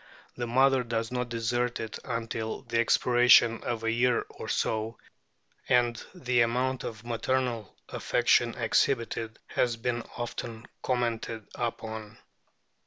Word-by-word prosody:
The 120 -1 -3
mother 130 +2 +4
does 115 -1 -2
not 125 -1 -2
desert 120 +1 -1
i - - -2
o - - -1
it 110 - -8
until 115 -2 -3
the 115 -1 -1
expiration 120 -1 +5
of 115 -2 -3
a 115 - +1
year 120 +1 +2
or - - -8
so, 110 +1 -1 0.7
and 120 -1 +4 0.2
the 125 -8 +1
amount 125 +3 +1
of 110 0 -7
maternal 120 -2 -1
affection - - +2
exhibited 115 -3 0
has 120 -2 0
been 120 0 -1 0.2
often 115 -1 -5 0.2
com 125 -1 0
mented 115 -2 -3
upon. 110 -3 -5
120 Hz, 135 wpm, -29 LUFS, 115-125 Hz, 0.7 s, expiration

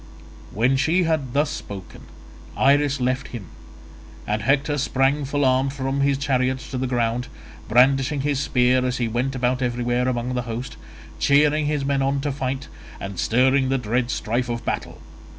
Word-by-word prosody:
When 125 +5 +2
she 170 +6 +2
had 155 -7 -1
thus 145 +1 +1
spoken 95 - -8 0.5
Iris 140 +1 +3
left 130 +1 -1
him, 105 -9 -8 0.8
and 105 +1 -1
Hector 145 +2 +1
sprang 135 +2 +1
full 145 +1 0
armed 130 +1 +2
from 135 0 -2
his 140 0 +2
chariot 130 -2 0
to 130 - -3
the 130 - -1
ground, 120 0 -1 0.4
brandishing 135 +4 +3
his 140 -1 0
spear 125 -2 +2
as 125 0 -1
he 120 - 0
went 125 +4 -1
about 125 +1 0
everywhere 120 0 0
among 125 0 -1
the 125 - -1
host, 120 +3 -5 0.4
cheering 150 +1 +3
his 145 -2 -1
men 140 0 +1
on 135 +1 +1
to 145 0 -1
fight, 135 0 -3 0.3
and 100 -2 -6
stirring 130 +3 +3
the 135 - +2
dread 120 +1 -1
strife 120 +1 -1
of 120 0 -4
battle. - - -3
130 Hz, 170 wpm, -23 LUFS, 125-140 Hz, 0.8 s, Iris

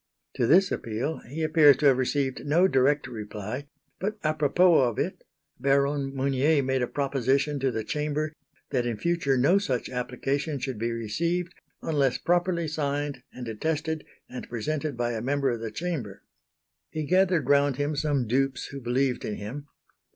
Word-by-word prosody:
To 120 -3 0
this 185 +6 +5
appeal 115 +8 -2
he 160 +4 -3
appears 155 -3 +6
to 150 - -1
have 135 -2 +5
received 135 0 -1
no 165 +6 +4
direct 140 -2 +2
reply; 110 +2 -6 0.3
but 210 +3 -2
apropos 155 +3 +4
of 115 - -7
it, - - -2 0.4
Baron 140 +1 +1
Mounier 140 +2 +2
made 130 0 0
a 125 - +1
proposition 140 +1 0
to 135 0 +1
the 110 -3 -3
Chamber 150 +4 -2 0.4
that 125 -2 0
in 115 -3 -2
future 170 -3 +1
no 160 +10 +4
such 130 -13 -2
application 135 +4 -2
should 130 -3 -4
be 115 +1 -1
received 170 - -2 0.3
unless 140 -5 +1
properly 175 -1 +1
signed 145 -3 -2
and 125 -1 -8
attested 155 +7 -2 0.2
and 125 - -8
presented 140 +4 -3
by 120 0 0
a 115 -2 -3
member 135 +1 +1
of 120 - -3
the 115 - -3
Chamber. 115 - -4 0.7
He 155 - -3
gathered 185 0 +2
round 140 -1 +4
him 145 +1 -1
some 145 -3 0
dupes 130 +3 0
who 140 -1 -7
believed 125 +1 0
in 105 - -3
him. 135 +8 -7
140 Hz, 165 wpm, -27 LUFS, 125-155 Hz, 0.7 s, appears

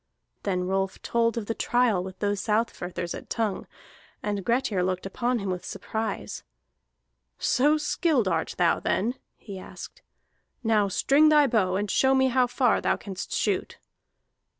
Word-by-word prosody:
Then 185 -2 -1
Rolf 190 +1 -1
told 230 -1 +1
of 225 - -2
the 225 - -2
trial 235 -6 +1
with 185 0 -8
those 205 -1 -1
Southfirthers 190 -6 -2
at - - -9
Tongue, 215 -4 -2 0.6
and 205 -2 -2
Grettir 230 -4 +1
looked 185 0 -1
upon 240 +5 -1
him 200 -4 -3
with 180 -1 -4
surprise. 220 0 -4 1.0
"So 295 +4 +3
skilled 300 - +1
art 165 -3 -1
thou 175 -2 +3
then?" 230 +5 0 0.2
he 195 -3 -9
asked. - - -10 0.6
"Now 215 -3 +3
string 285 +10 +4
thy 300 -1 +6
bow, 210 -8 +1
and 205 +1 -1
show 265 0 +3
me 265 0 +4
how 250 0 +3
far 245 -1 +2
thou - - +1
canst 190 -2 -7
shoot." - - -1
215 Hz, 150 wpm, -26 LUFS, 190-245 Hz, 1.0 s, thy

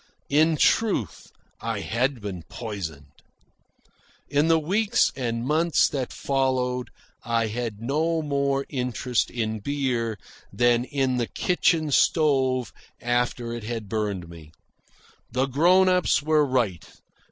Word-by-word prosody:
In 155 +2 +4
truth, 190 - +1 0.3
I 115 -3 -3
had 125 +4 -1
been 95 -4 -5
poisoned. 95 - -6 1.2
In 145 +2 +2
the 165 0 +5
weeks 200 +8 +2
and 120 -3 -2
months 160 +4 +3
that 130 -3 -3
followed 130 -2 -1 0.3
I 115 -1 +1
had 110 -1 -4
no 160 +5 0
more 140 -1 0
interest 125 -2 -1
in 110 -2 -3
beer 125 -4 -1 0.3
than 120 0 +2
in 135 -3 0
the 120 -2 -1
kitchen 165 -4 +1
stove 135 -5 +2 0.3
after 120 -1 -1
it 120 -2 -6
had 115 -1 -5
burned 100 -4 -2
me. 80 -2 -13 0.8
The 130 +1 +1
grown 175 +8 +4
ups 180 -5 +2
were 155 0 +3
right. 115 - 0
125 Hz, 120 wpm, -25 LUFS, 115-145 Hz, 1.2 s, the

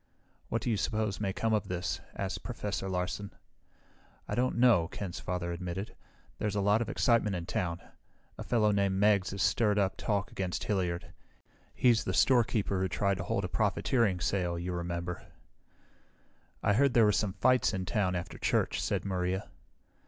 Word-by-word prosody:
"What 115 - -1
do 120 - 0
you 110 - +1
suppose 105 -1 -1
may 100 -2 0
come 110 +3 -1
of 105 - 0
this?" 85 -3 -3
asked 95 -1 -3
Professor 105 -5 -4
Larsen. 95 +2 -2 1.0
"I - - -4
don't 125 0 0
know," 120 -9 +5
Ken's 90 0 -6
father 90 -1 -3
admitted. 90 +3 -5 0.4
"There's 105 -1 -1
a - - +1
lot 105 +3 +3
of 120 - -2
excitement 115 -5 +2
in 85 -1 -4
town. 85 -1 -2 0.5
A - - -7
fellow 110 -3 +2
named 100 -1 +1
Meggs 100 -1 +3
is 100 -3 -1
stirring 105 +4 +2
up 95 -2 +1
talk 105 -2 -1
against 90 -2 -3
Hilliard. 90 -4 -2 0.6
He's 120 -3 +4
the - - -2
storekeeper 115 -6 +3
who 95 - +1
tried 100 +1 0
to - - -3
hold - - -1
a - - -1
profiteering 115 -8 +1
sale, 90 -3 0
you 90 +2 -3
remember." 85 0 -4 1.4
"I 105 - +3
heard 135 +4 +3
there 115 -2 +7
were 105 - +5
some 105 -2 0
fights 130 +1 +3
in 95 -1 -3
town 90 0 0
after 85 -1 -5
church," - - +1
said - - -1
Maria. 95 0 -2
100 Hz, 175 wpm, -31 LUFS, 90-110 Hz, 1.4 s, there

